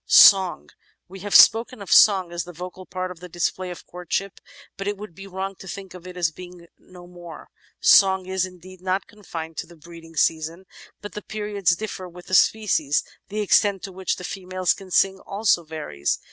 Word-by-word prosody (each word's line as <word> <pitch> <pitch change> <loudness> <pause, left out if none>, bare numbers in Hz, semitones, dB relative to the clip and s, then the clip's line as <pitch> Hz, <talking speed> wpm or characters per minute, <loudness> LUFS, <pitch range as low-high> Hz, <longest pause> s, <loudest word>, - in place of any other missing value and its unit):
Song 190 -3 +6 0.4
We 190 +2 -11
have 205 +2 -3
spoken 230 +1 +6
of 200 - -8
song 190 -4 +6
as 175 0 -3
the 180 - -10
vocal 180 +2 -9
part 185 0 -4
in 180 - -10
the 180 - -9
display 175 +2 -2
of 175 - -9
courtship, 180 +2 -4 0.4
but 195 - -6
it 205 0 -2
would 210 -3 -9
be 195 +3 -11
wrong 190 +1 -4
to 190 - -11
think 195 0 -8
of 180 0 -11
it 180 0 -10
as 170 -3 +1
being 175 +1 -12
no 180 -1 -15
more. 175 -2 -12 0.3
Song 190 -1 +5
is, 190 0 -1
indeed, 185 0 -9
not 185 +1 -1
confined 165 -6 -8
to - - -4
the 175 - -15
breeding 165 0 -14
season, 160 +4 0 0.4
but 205 - -7
the 210 - -6
periods 205 -4 -1
differ 190 -2 -6
with 175 +1 -13
the - - -9
species; 185 -8 +3 0.3
the 210 +1 -2
extent 200 -1 +2
to 195 - -6
which 190 0 -2
the 180 - -10
females 185 0 -1
can 195 -1 -12
sing 190 +1 +2
also 200 -4 +1
varies. 150 - -3
185 Hz, 200 wpm, -23 LUFS, 175-195 Hz, 0.4 s, Song